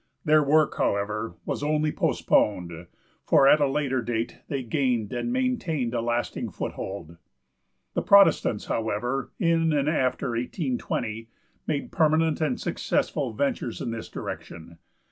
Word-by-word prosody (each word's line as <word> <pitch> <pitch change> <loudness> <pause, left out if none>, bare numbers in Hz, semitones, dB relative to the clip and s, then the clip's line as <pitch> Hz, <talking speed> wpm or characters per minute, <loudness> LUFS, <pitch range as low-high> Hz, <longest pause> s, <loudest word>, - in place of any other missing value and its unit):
Their 155 0 +5
work, 150 +1 +3
however, 105 +2 -1
was - - -3
only 150 +1 +1
postponed, 85 - 0 0.4
for 135 - +5
at 150 - +6
a 145 - +4
later 135 -2 0
date 115 0 -3
they 140 -3 -3
gained 120 -4 0
and 125 - -2
maintained 200 - -1
a 120 - 0
lasting 120 +1 -2
foothold. 85 -4 -6 0.8
The - - 0
Protestants, 200 - +5
however, 120 +4 -2
in 165 -3 +2
and 145 -1 +1
after 130 -4 0
1820, 120 - -3 0.4
made 145 -2 -2
permanent 160 0 +2
and 200 +11 0
successful - - -1
ventures 265 - -2
in 120 - -3
this 115 -1 -6
direction. 85 0 -8
130 Hz, 130 wpm, -26 LUFS, 115-155 Hz, 0.8 s, at